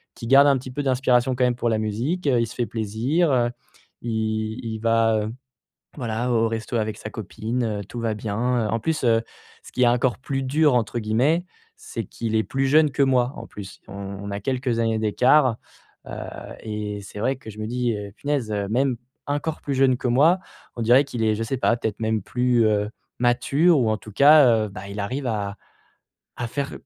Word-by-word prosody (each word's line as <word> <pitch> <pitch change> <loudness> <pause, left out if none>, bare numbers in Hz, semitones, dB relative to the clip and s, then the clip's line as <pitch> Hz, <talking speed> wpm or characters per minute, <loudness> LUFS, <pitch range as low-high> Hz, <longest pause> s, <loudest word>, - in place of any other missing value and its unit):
qui 115 - -7
garde 135 +3 +7
un 140 -1 +4
petit 130 0 -8
peu 145 +3 -3
d'inspiration 130 -1 +2
quand 125 - +2
même 125 -1 +1
pour 120 -1 -1
la 110 -1 +1
musique, 125 - -2
heu, 125 -3 +3
il 115 - 0
se 115 - -9
fait 120 - 0
plaisir, 120 - 0
heu, 120 -2 +2 0.5
il 110 0 -2
il 110 -1 -4
va, 115 -1 +3
heu, 110 - -4 0.7
voilà, 120 -1 -2
au 115 -1 +3
resto 115 +1 -3
avec 110 -1 -2
sa 110 - -7
copine, 110 0 -3
tout 120 - -6
va 115 -1 0
bien, 105 -1 -4 0.3
heu, - - -4
en 115 - 0
plus, 160 +5 -2
heu, 115 -1 +4 0.4
ce - - -13
qui 125 - +1
est 120 - +5
«encore 120 0 +2
plus 135 0 -3
dur» 145 +1 +3
entre 120 0 0
guillemets, 130 +11 +1 0.3
c'est 430 0 -6
qu'il 115 -1 -5
est 110 - +3
plus 135 0 -1
jeune 155 +2 +5
que 140 - +2
moi, 130 -1 +2
en - - -7
plus, 95 -2 -10
on 95 - -10 0.3
on 100 - -5
a 100 - -3
quelques 125 -1 -1
années 115 -1 +1
d'écart, 125 +3 +3 0.5
heu - - -8 0.5
et 105 -1 -4
c'est 100 - -9
vrai 130 +5 +1
que 110 - -11
je 105 - -12
me 110 - -3
dis: 120 0 0
«Eh, 105 -2 -5
punaise, 140 -2 -2 0.2
même 130 +1 +1 0.3
encore 145 +2 -2
plus 140 - -2
jeune 130 -1 +4
que 125 - -3
moi, 155 +9 +4 0.4
on 120 - -3
dirait 125 +5 +6
qu'il 120 -5 -3
est, 110 -1 +2
je 115 - -2
sais 130 +4 -2
pas, 120 -1 +2
peut-être 110 -3 -3
même 110 -1 0
plus, 125 -2 +2
heu, 105 -1 +1 0.3
mature 140 +7 +3
ou 115 - +2
en 110 - 0
tout 110 +1 -12
cas, 140 -4 +6
heu, - - -6
bah, 100 0 -9
il 100 +1 -6
arrive 130 +7 -3
à 105 -3 -2 0.8
à 120 - -3
faire 140 +3 -3
120 Hz, 215 wpm, -23 LUFS, 110-135 Hz, 0.8 s, garde